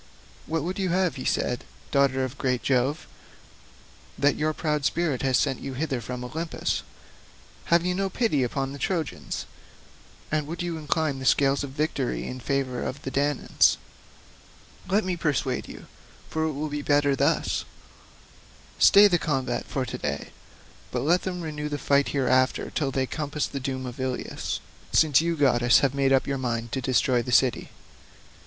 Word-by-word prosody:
"What 160 -2 -1
would 185 +4 -3
you 190 -1 0
have," 180 -4 +1
said 125 - 0
he, - - -17 0.3
"daughter 135 -2 +3
of 130 +2 -5
great 125 -2 0
Jove, 135 +4 +1 1.1
that 145 0 +3
your 155 +1 0
proud 150 -2 -1
spirit 155 -3 0
has 130 -2 +2
sent 135 -3 0
you 135 -1 -6
hither 135 -3 -2
from 125 +2 -5
Olympus? 160 +6 -2 0.8
Have 170 0 +3
you 180 - +1
no 195 +1 -1
pity 205 - +1
upon 135 +2 -1
the 140 - -8
Trojans, 165 +2 -3 0.9
and 150 -1 0
would 170 +2 -4
you 170 -2 -3
incline 150 -2 -1
the 130 - -6
scales 140 +1 +3
of 140 - -4
victory 145 -2 -2
in 130 - -5
favour 130 -1 -1
of 140 +3 -5
the 135 - -4
Danaans? 145 0 +2 1.1
Let 205 +3 +3
me 185 -1 -1
persuade 150 -6 -1
you—for 160 0 -7
it 160 - -1
will 150 +2 -3
be 145 0 -3
better 145 -1 +3
thus—stay 135 - +1
the 175 -4 +2
combat 135 -6 -1
for 130 -2 -2
to - - -5
day, - - -3 0.6
but 125 - -2
let 170 +7 +3
them 180 -2 -4
renew 150 -2 -4
the 145 - -2
fight 140 0 +2
hereafter 130 -1 +1
till 145 -3 -1
they 135 0 0
compass 150 +1 -2
the 140 - -5
doom 130 0 -3
of 125 0 -7
Ilius, 130 -1 -3 0.3
since 155 -3 +5
you 170 0 0
goddesses 120 -4 +4
have 135 -2 +2
made 135 -1 +2
up 135 -1 +4
your 140 -1 -2
minds 120 -2 -2
to 130 - -2
destroy 125 -1 +2
the 125 - -5
city." 125 +1 +3
140 Hz, 170 wpm, -26 LUFS, 130-155 Hz, 1.1 s, since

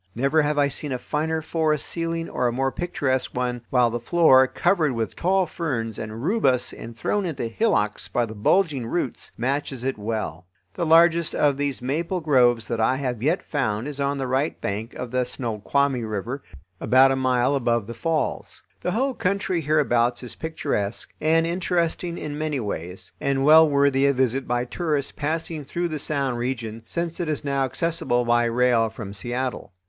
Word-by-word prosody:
Never 140 +6 +2
have 150 0 0
I 145 -1 +4
seen 145 +1 -4
a 130 - -1
finer 160 +4 -2
forest 155 -2 0
ceiling 165 0 -3
or 125 - 0
a - - +1
more 135 +2 0
picturesque 130 -7 -2
one, 125 -1 -1
while 125 -2 +3
the 120 - -2
floor, 130 -1 +5
covered 170 -2 +1
with 115 -5 -3
tall 190 +1 +2
ferns 130 - -3
and 110 +2 -6
rubus 140 - +1
and 115 0 -9
thrown 205 - 0
into 160 -9 -3
hillocks 115 - 0
by 120 - 0
the 110 - -8
bulging 135 - +1
roots, 135 -2 -3
matches 135 0 -2
it 130 -4 -2
well. 105 -5 -4 0.3
The 170 - -2
largest 165 0 +5
of 145 -2 +3
these 140 -3 -2
maple 165 +8 -1
groves 125 -7 +3
that 115 - -2
I 130 +4 +3
have 125 -4 -3
yet 160 +8 +1
found 120 -5 -1
is 145 -1 -5
on 140 0 0
the 135 - -2
right 135 +4 -1
bank 105 +4 -4
of 125 -1 -6
the 125 0 +1
Snoqualmie 125 +2 -1
River, 110 +5 -4 0.4
about 130 +1 +5
a - - +2
mile 130 0 +2
above 120 -5 +1
the 115 - -7
falls. 155 +7 -2 0.2
The 180 - -2
whole 265 +4 +1
country 185 -4 -1
hereabouts 125 -6 +1
is 125 - -5
picturesque, 120 -10 -3
and 165 +1 +3
interesting 175 0 -1
in 150 0 -5
many 155 -3 -1
ways, 95 -4 -5
and 135 0 +1
well 160 +1 +8
worthy 140 -1 +3
a 140 - +3
visit 130 0 0
by 120 0 0
tourists 150 0 -2
passing 155 +1 -3
through 170 +5 -2
the 155 -2 -4
Sound 135 -4 -1
region, 115 -3 -3
since 170 -1 -3
it 170 -3 -2
is 150 -1 -2
now 140 -1 +1
accessible 130 -4 0
by 120 0 +3
rail 120 -1 +2
from 110 -2 -8
Seattle. 120 0 -4
135 Hz, 185 wpm, -24 LUFS, 120-160 Hz, 0.4 s, well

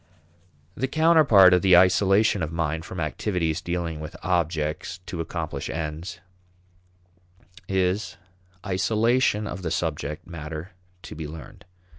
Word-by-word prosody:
The 130 +7 -2
counterpart 150 - +6
of 90 - +4
the 95 -2 +6
isolation 95 +3 +4
of 80 -1 -2
mind 80 0 -2
from 95 - -7
activities 80 0 -1
dealing 85 -3 -3
with 75 +1 -8
objects 85 -1 -1
to 85 - -4
accomplish - - -5
ends 80 +2 -5 1.5
is 95 +2 -1 0.5
isolation 110 +3 +1
of 95 -3 -6
the 85 - -3
subject 75 -2 -3
matter 80 0 -7 0.3
to - - -9
be 80 -1 -6
learned. 80 +2 -11
90 Hz, 120 wpm, -25 LUFS, 80-95 Hz, 1.5 s, counterpart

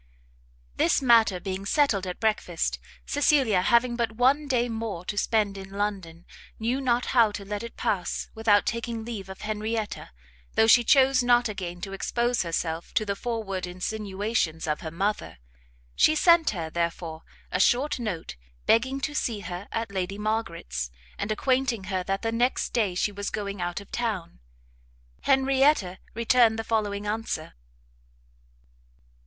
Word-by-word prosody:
This - - +3
matter 230 -7 +4
being 190 +1 -4
settled 200 -4 +2
at 180 - -5
breakfast, 210 -6 0 0.3
Cecilia, 270 -9 +3
having 235 +5 +3
but 235 -2 -1
one 265 +6 +2
day 245 -3 +1
more 220 -6 -4
to 205 - -3
spend 205 -2 +1
in 190 0 -9
London, 195 -4 -4 0.3
knew 240 +5 -1
not 245 -2 +1
how 230 -4 +5
to 200 - -6
let 205 +1 -4
it 235 0 -8
pass 185 -4 -1
without 220 -2 +3
taking 230 -1 -3
leave 210 -5 -6
of 190 - -9
Henrietta, 215 0 -3 0.5
though - - +5
she 240 +2 +6
chose 265 +1 +5
not 240 0 +4
again 180 -4 -6
to 195 0 -5
expose 240 +4 0
herself 165 -1 -3
to 215 - +2
the 200 -1 -1
forward 200 -5 -3
insinuations 195 -2 -2
of 150 -1 -2
her 160 - -5
mother; 195 +6 -2 0.6
she 310 - +4
sent 335 0 +5
her, 165 -5 -4
therefore, 170 -1 -3 0.3
a 185 - 0
short 255 +8 +2
note, 180 - -4 0.3
begging 260 +4 +3
to 295 +1 -2
see 230 -7 -1
her 180 +2 -6
at 225 -2 -3
Lady 190 0 -3
Margaret's, 210 - -2 0.3
and 210 - -2
acquainting 255 -1 +1
her 185 - +1
that 195 +2 -2
the 225 - 0
next 240 +3 0
day 210 -7 +1
she 205 - 0
was 205 0 -4
going 200 -2 -4
out 175 +1 -2
of 200 - -14
town. 210 - -3 0.9
Henrietta 270 -7 +3 0.2
returned 230 -1 +4
the 225 - -2
following 210 -2 -1
answer. 210 -6 -3
215 Hz, 155 wpm, -26 LUFS, 190-235 Hz, 0.9 s, she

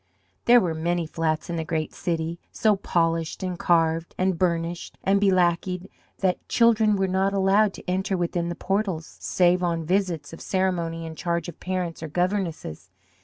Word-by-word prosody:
There 240 +1 +7
were 175 -6 0
many 170 +1 -1
flats 155 0 -1
in 170 - -3
the 160 - -1
great 155 -1 -2
city, 165 0 -2
so 215 -2 +3
polished 165 -3 0
and 180 -2 -3
carved 165 -1 +1
and 185 0 +1
burnished 170 0 -1
and 195 +1 +3
be 200 - +5
lackeyed 180 0 +1 0.3
that 185 -2 0
children 220 -3 +4
were 195 -1 +1
not 190 +1 +1
allowed 195 +1 +3
to - - -12
enter 190 +1 0
within 175 0 -1
the 175 - -3
portals, 195 -5 -2
save 180 0 +2
on 170 -2 -1
visits 180 -3 -1
of 165 - -9
ceremony 170 -3 -1
in 160 - -6
charge 170 0 -2
of 170 - -11
parents 180 -3 -3
or 160 - -4
governesses. 175 - -2
175 Hz, 170 wpm, -25 LUFS, 165-190 Hz, 0.3 s, There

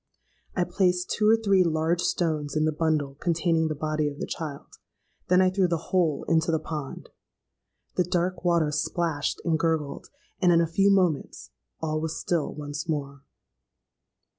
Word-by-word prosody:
I 180 - +2
placed 180 0 0
two 210 0 +2
or 225 - +7
three 200 -4 +3
large 165 +1 +1
stones 155 -6 -1
in 155 0 +2
the 155 - +2
bundle 155 -3 0
containing 165 -1 +1
the 155 - -2
body 155 0 -1
of 145 - -10
the - - -3
child: 150 -4 -7 0.5
then 180 +1 +5
I 185 - +3
threw 185 -1 +2
the 170 -2 -3
whole 165 -6 +1
into 165 0 +2
the 160 - +2
pond. 155 -3 -6 0.9
The 180 - +4
dark 180 +1 -1
water 170 -4 +2
splashed 155 0 -1
and 165 -2 +1
gurgled; 155 -4 -1 0.3
and 180 -2 +5
in 170 - +5
a 170 - +3
few 195 +5 +2
moments 185 -7 0 0.3
all 155 -1 -1
was 160 0 -3
still 170 -4 -1
once 145 +3 -6
more. 140 -3 -3
165 Hz, 165 wpm, -26 LUFS, 155-180 Hz, 0.9 s, or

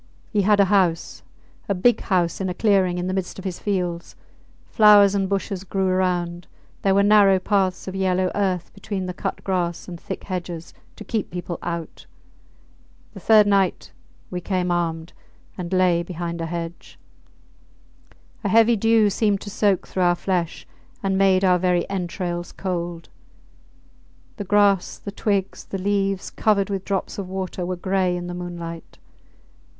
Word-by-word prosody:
He 210 - +3
had 205 +1 +3
a 200 - +6
house 185 -4 +1 0.5
a 200 - +1
big 225 +5 +3
house 180 -2 0
in 190 - -1
a 180 - -4
clearing 190 -4 +2
in 180 - -2
the 185 - -2
midst 190 -2 -3
of 190 - -9
his 185 -2 -4
fields; 180 -4 -3 0.5
flowers 205 -2 +6
and 195 -2 0
bushes 195 -1 -2
grew 195 0 -1
around; 175 -2 -1 0.3
there 195 -1 +2
were 200 - +4
narrow 200 -2 +6
paths 190 -1 0
of 190 - -4
yellow 185 -1 +1
earth 185 -4 -1
between 200 -1 -4
the 180 - -4
cut 195 +2 -5
grass, 175 -3 -2
and 175 -2 -8
thick - - -6
hedges 175 -3 -5 0.2
to - - -9
keep 220 -3 -3
people 175 -1 -5
out. 170 -2 -6 1.1
The - - -9
third 215 -2 +6
night 195 -3 +1 0.4
we 180 -1 -3
came 180 -1 -1
armed, 165 -1 -2 0.4
and 175 -1 -6
lay 185 -2 +3
behind 170 -1 -5
a 165 - -2
hedge. 170 0 -6 1.5
A 205 - 0
heavy 230 +3 +5
dew 225 -1 +3
seemed 205 -1 +1
to 205 - -7
soak 200 -2 +1
through 185 - -3
our 175 -1 +4
flesh 175 -2 -2 0.4
and 195 -1 +1
made 190 -1 +3
our 180 -1 +4
very 180 -1 +1
entrails 175 -2 -3
cold. 175 -3 -4 1.3
The 205 - -5
grass, 200 -1 +3
the 200 - -7
twigs, 200 -2 -1
the 195 - -5
leaves, 195 0 -1
covered 205 -2 +1
with 195 -1 -3
drops 195 0 -2
of 190 -2 -5
water, 185 -1 -4
were 185 - -2
gray 185 0 0
in 175 - -5
the 175 - -5
moonlight. 170 -2 -7
185 Hz, 165 wpm, -23 LUFS, 175-200 Hz, 1.5 s, a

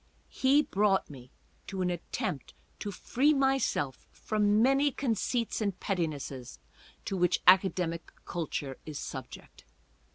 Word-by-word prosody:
He 275 +3 +4
brought 200 - +1
me 130 -3 -12 0.4
to 190 -2 -2
at 175 -2 -3
tempt 135 -4 -3 0.2
to 205 - -4
free 280 +9 +2
myself 270 - 0
from 210 -1 +1
many 270 +4 +4
conceits 240 -3 -1
and 200 -3 -1
pettinesses 145 - -3 0.5
to 195 - -2
which 180 -2 +1
academical 180 -3 +3
culture 145 -5 -4
is 155 -2 -7
subject. - - -8
190 Hz, 120 wpm, -30 LUFS, 165-240 Hz, 0.5 s, He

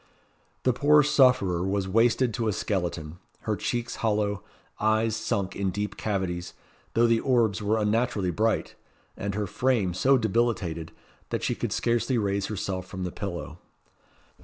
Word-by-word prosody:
The 130 - +3
poor 150 +4 +5
sufferer 125 -12 +3
was 95 0 -1
wasted 115 +4 +3
to 115 0 -1
a 105 - +1
skeleton; 85 -5 -3 0.2
her 110 - -1
cheeks 120 +3 -3
hollow; 105 -3 0 0.4
eyes 110 +1 +2
sunk 100 -3 -2
in 100 -1 0
deep 105 +2 -3
cavities, 90 -4 -3 0.4
though 115 +1 +5
the 115 -1 +3
orbs 115 -6 +2
were 105 +2 +1
unnaturally 105 -3 +1
bright; 110 +5 0 0.4
and 100 0 -4
her 105 0 -1
frame 115 -3 +1
so 130 +9 +4
debilitated, 105 -8 0 0.4
that - - -2
she - - +1
could - - -3
scarcely 120 +1 +1
raise 100 -2 0
herself 95 -3 -4
from 95 -1 -6
the 90 - -3
pillow. 85 -4 -6
105 Hz, 150 wpm, -27 LUFS, 95-115 Hz, 0.4 s, poor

